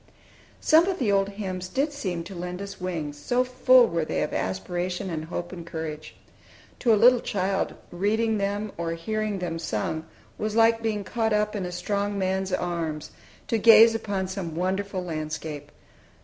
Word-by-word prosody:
Some 325 +3 +5
of 380 -2 0
the 230 -7 +1
old 195 0 +2
hymns 190 -3 -5
did 290 +3 0
seem 185 -12 -3
to 190 +4 -9
lend 180 0 -5
us 195 -1 -7
wings, 155 -5 -4
so 245 +11 +1
full 255 0 +5
were 170 -6 -1
they - - -1
of 150 - -4
aspiration 175 - -2
and 155 -1 -3
hope 175 +1 -5
and 175 -2 -7
courage. 160 -2 -6 0.6
To 235 - +3
a 215 - +6
little 245 +3 +6
child, 195 -2 -1 0.2
reading 215 +4 +1
them 205 +1 -2
or 165 -1 -1
hearing 215 +4 -2
them 170 -3 -3
sung 160 +3 -3 0.3
was 215 0 -2
like 225 0 +4
being 215 -2 -1
caught 225 +2 0
up 210 0 +1
in 190 -3 -2
a - - -6
strong 200 +3 -2
man's 190 0 -1
arms, 170 -4 -2 0.4
to 225 - +1
gaze 225 +1 +8
upon 205 -4 -2
some 185 -4 -5
wonderful 190 +2 -1
landscape. 155 -3 -5
190 Hz, 175 wpm, -26 LUFS, 170-215 Hz, 0.6 s, gaze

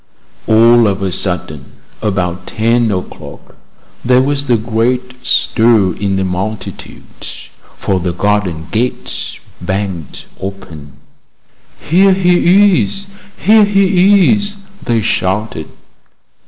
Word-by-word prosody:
All 115 +1 +5
of 100 -1 -2
a 95 - -1
sudden, 75 -7 -4 0.3
about 90 -3 -2
ten 115 +1 +1
o'clock, 90 -2 -7 0.5
there 125 +1 +4
was 140 0 -2
a 120 - +4
great 125 +3 -2
stir 110 -5 +2
in 100 +1 -2
the 95 - 0
multitude, 95 +4 -6 0.5
for 95 -1 -1
the 90 0 -2
garden 90 -3 -1
gate 120 +3 -3 0.2
banged 95 -5 -4
open. 90 -7 -8 0.9
"Here 190 +5 +4
he 185 - +4
is! 195 - -5 0.3
here 215 +1 +5
he 195 -1 +4
is!" 205 -1 -2 0.3
they 115 -2 0
shouted. 95 -4 -2
110 Hz, 105 wpm, -14 LUFS, 95-140 Hz, 0.9 s, All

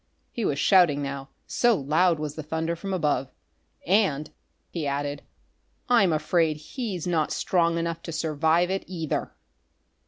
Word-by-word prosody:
He 235 - -4
was 140 - 0
shouting 160 -4 +4
now, 140 0 -5 0.2
so 240 -2 +3
loud 160 +3 +2
was 150 -1 -4
the 155 - -6
thunder 160 +2 -2
from 195 +4 -6
above. 150 -7 0 0.6
"And," 175 -6 +2 0.4
he 160 -4 -3
added, 145 0 -2 0.7
"I'm 230 -8 +5
afraid 155 0 +1
he's 185 - -5
not 165 -4 0
strong 170 -2 +1
enough 170 0 -2
to - - -3
survive 160 +3 +1
it, 195 - -1
either!" 165 -5 -3
160 Hz, 145 wpm, -26 LUFS, 150-180 Hz, 0.7 s, I'm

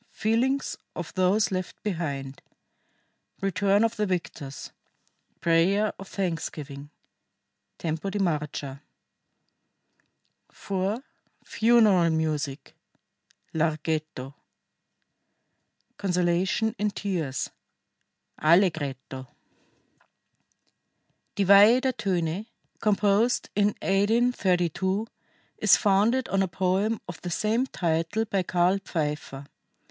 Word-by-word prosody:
FEELINGS 250 +5 0 0.2
OF 175 -2 -6
THOSE 190 +3 +2
LEFT 185 -1 -4
BEHIND. 140 -8 -4 1.0
RETURN 195 +2 +2
OF 230 0 0
THE 210 -1 0
VICTORS. 165 -6 -4 0.7
PRAYER 185 +6 +2
OF 195 - -9
THANKSGIVING 150 -6 -4 0.9
(Tempo 160 +3 -3
di 200 - -3
marcia) 150 -6 -2 1.7
4. 200 +5 -3 0.4
FUNERAL 220 -7 +4
MUSIC 155 -3 -2 0.8
(Larghetto) 155 -3 -2 1.6
CONSOLATION 185 +4 0
IN 210 +1 +1
TEARS 175 -10 -3 0.9
(Allegretto) 150 -6 +1 2.1
Die 200 - +1
Weihe 205 +5 +8
der 260 0 +1
Töne, 185 -2 -2 0.3
composed 210 +2 +2
in 205 0 +4 0.2
1832, 195 -3 +1 0.5
is - - +6
founded 215 +5 +2
on 195 +1 +1
a 190 - +1
poem 190 +5 0
of 175 -2 -8
the 180 - -5
same 220 +9 0
title 165 +3 -1
by 200 -3 0
Karl 180 +2 +2
Pfeiffer. 150 -5 -3
185 Hz, 85 wpm, -26 LUFS, 160-205 Hz, 2.1 s, Weihe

